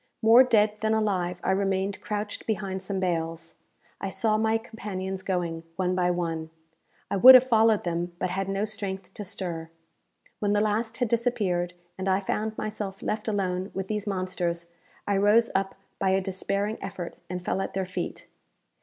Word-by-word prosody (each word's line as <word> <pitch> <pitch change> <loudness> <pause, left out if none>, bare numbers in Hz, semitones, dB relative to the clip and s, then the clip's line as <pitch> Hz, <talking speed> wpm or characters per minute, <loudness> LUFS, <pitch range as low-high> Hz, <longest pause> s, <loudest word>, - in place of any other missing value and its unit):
More 230 +3 +8
dead 215 -4 +3
than 220 0 +1
alive, 185 -5 0
I - - +2
remained 195 0 0
crouched 210 0 -4
behind 195 -3 -2
some 190 0 -2
bales. 165 -2 -2 0.5
I 195 - -3
saw 215 +3 +2
my 220 +1 +2
companions 195 -4 -5
going, 175 -4 -2
one 185 0 0
by 180 -1 +2
one. 165 -2 -2 0.6
I - - +1
would 255 +7 +11
have 255 - +9
followed 225 -4 +4
them, 175 0 -2
but 180 0 -2
had 195 +1 -2
no 195 +2 0
strength 200 -3 -5
to 210 - -6
stir. 175 -5 -4 0.7
When 205 -1 +1
the 205 - +3
last 220 +2 0
had 245 - +1
disappeared, 205 -7 0 0.2
and 190 +1 -1
I 190 0 +3
found 215 +2 -2
myself 210 -2 -4
left 215 +1 -2
alone 190 -3 -1
with 190 0 -3
these 210 -1 -2
monsters, 180 -3 -2 0.4
I 200 -1 +2
rose 210 +4 +4
up 195 0 0 0.2
by 195 - +2
a 190 +1 +3
despairing 200 +2 -2
effort 180 -3 -6
and 180 -1 -5
fell 195 - 0
at - - -4
their 190 -1 0
feet. 185 - -5
195 Hz, 175 wpm, -27 LUFS, 185-215 Hz, 0.7 s, would